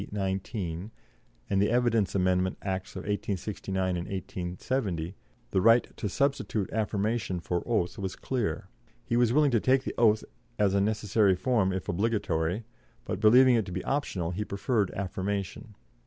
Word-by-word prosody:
19, 95 -2 -3 0.6
and 100 -1 +1
the 100 - +3
Evidence 115 -4 +2
Amendment 95 -1 +1
Acts 95 -1 -3
1869 95 -2 -2
and 90 -1 -2
1870, 90 0 -3 0.4
the 95 - +2
right 115 +3 +4
to 105 - -3
substitute 135 -7 0
affirmation 105 -2 -1
for 85 0 -2
oath 110 -7 0
was 95 -1 -3
clear; 105 -9 -2 0.4
he 120 - -1
was 120 -1 +4
willing 145 +1 +4
to 115 - +3
take 130 +4 +3
the - - -4
oath 110 -2 +4 0.3
as 100 -2 +2
a 100 - +3
necessary 105 -1 +2
form 105 -2 +1
if 95 -1 -4
obligatory, 95 -2 0 0.4
but, - - -3
believing 125 +4 +7
it 115 -3 +2
to - - -6
be 90 +1 -3
optional, 95 - -1
he 100 +4 -2
preferred 100 0 0
affirmation. 100 +2 -4
100 Hz, 150 wpm, -28 LUFS, 95-115 Hz, 0.6 s, believing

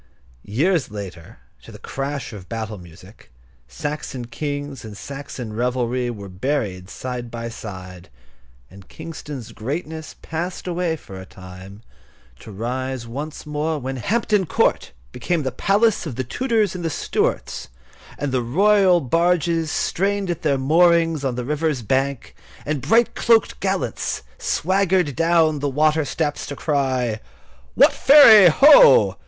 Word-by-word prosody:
Years 150 - +1
later, 95 -6 -9 0.2
to - - -14
the - - -11
crash 135 -2 -5
of 95 -3 -11
battle 110 -2 -5
music, 85 -2 -16 0.4
Saxon 145 -4 -5
kings 145 +1 -5
and 105 -2 -9
Saxon 135 -5 -7
revelry 125 +1 -1
were 100 -4 -7
buried 95 -2 -3
side 125 -2 -6
by 115 0 -6
side, 95 -5 -9 0.6
and 95 0 -15
Kingston's 150 -6 -8
greatness 155 +6 -6
passed 170 +3 -5
away 175 -2 -1
for 95 -11 -11
a - - -10
time, 95 +3 -12 0.6
to 110 - -11
rise 125 +4 -4
once 145 +8 -7
more 150 +1 -2
when 135 -1 -5
Hampton 210 - 0
Court - - +1 0.2
became 170 - -2
the 130 - -2
palace 200 - +1
of 135 - -6
the 130 - -2
Tudors 220 - 0
and 180 -2 -6
the 165 - -1
Stuarts, - - -2 0.5
and 145 -2 -3
the 130 -1 0
royal 185 - +3
barges 165 +2 +1
strained 195 +2 -1
at 170 - -5
their 145 -4 +1
moorings 165 +2 +3
on 130 -3 -1
the 125 0 -4
river's 150 -2 -1
bank, 135 +3 -1 0.3
and 145 -2 -2
bright 230 - +3
cloaked 225 -1 +2
gallants 190 - -2 0.2
swaggered 185 -4 +1
down 165 -2 +2
the 145 0 -1
water 155 +2 +2
steps 150 0 -3
to 140 - -6
cry: 130 -7 -1 0.6
"What - - +6
Ferry, 225 -10 +8
ho! 310 - +7
145 Hz, 140 wpm, -21 LUFS, 120-170 Hz, 0.6 s, Ferry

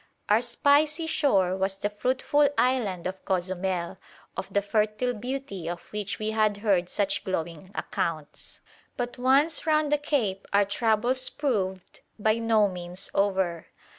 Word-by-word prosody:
Our 210 +2 +5
"spicy 290 +6 +2
shore" 205 - +2
was 190 0 -1
the 205 +1 -2
fruitful 260 +6 +2
island 230 -9 +1
of 185 +1 -4
Cozumel, 185 -1 -1 0.4
of - - -5
the 200 - +1
fertile 215 +4 0
beauty 240 -6 -5
of 175 0 -5
which 210 -2 -2
we 215 0 -2
had 215 -2 +2
heard 180 -4 +2
such 200 -1 0
glowing 170 -1 -4
accounts; 165 -7 -4 0.4
but 245 0 -4
once 280 +6 +3
round 305 -1 +2
the 295 - +3
cape, 225 -10 -1
our 200 0 +5
troubles 230 +5 +1
proved 195 -10 -2 0.2
by 220 +1 +2
no 225 -2 +3
means 180 +1 -7
over. 190 -4 0
210 Hz, 140 wpm, -27 LUFS, 190-255 Hz, 0.4 s, Our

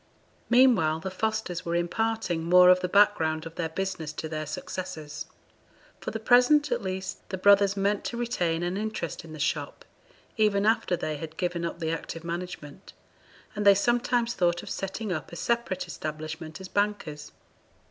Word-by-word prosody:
Meanwhile 235 -11 +5
the 190 - -4
Fosters 215 -3 -2
were 170 -1 -2
imparting 175 0 -1
more 180 +2 +7
of 180 - +5
the 180 - -2
background 165 -6 +3
of 165 - -8
their 165 -1 -3
business 185 -3 -3
to 160 - -5
their 155 -1 -4
successors. 155 -1 -6 0.7
For - - -5
the 220 - -4
present, 250 +6 +5
at 240 -1 0
least, 190 -1 -5
the 190 - -3
brothers 200 +1 +5
meant 200 +1 +1
to 235 - -3
retain 175 -9 -1
an 175 +2 -1
interest 210 -6 -4
in 165 - -12
the - - -8
shop, 145 - -2 0.5
even 210 -2 +3
after 215 -5 +2
they 155 -2 -3
had 160 +1 -8
given 175 -1 -2
up 170 - -3
the 160 -1 -1
active 165 0 -5
management; 170 -1 -7 0.6
and 210 - -2
they 200 -1 +7
sometimes 240 +2 +1
thought 175 -1 +1
of - - -8
setting 195 +2 -4
up 160 - -5
a - - -8
separate 235 -2 -1
establishment 155 0 -6
as 190 - -8
bankers. 200 -8 -2
185 Hz, 170 wpm, -27 LUFS, 165-210 Hz, 0.7 s, more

